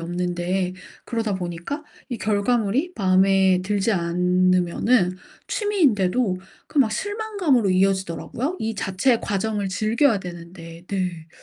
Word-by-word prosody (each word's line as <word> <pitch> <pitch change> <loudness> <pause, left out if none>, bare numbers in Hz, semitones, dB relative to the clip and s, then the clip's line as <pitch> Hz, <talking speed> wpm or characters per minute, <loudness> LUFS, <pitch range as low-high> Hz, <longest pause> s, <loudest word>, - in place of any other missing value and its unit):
없는데 180 +2 -2 0.3
그러다 225 -3 -2
보니까 180 - -5 0.3
이 245 -3 -4
결과물이 220 - +1
마음에 190 -1 +3
들지 205 +2 0
않으면은 180 +3 +2 0.3
취미인데도 245 - +1 0.3
그 295 - -2
막 220 -5 +4
실망감으로 395 - 0
이어지더라고요. 190 - 0
이 220 0 -2
자체의 205 +5 +1
과정을 205 0 -1
즐겨야 215 +5 +2
되는데. 170 -1 -10
네. 180 -5 -3
195 Hz, 295 characters per minute, -23 LUFS, 180-230 Hz, 0.3 s, 막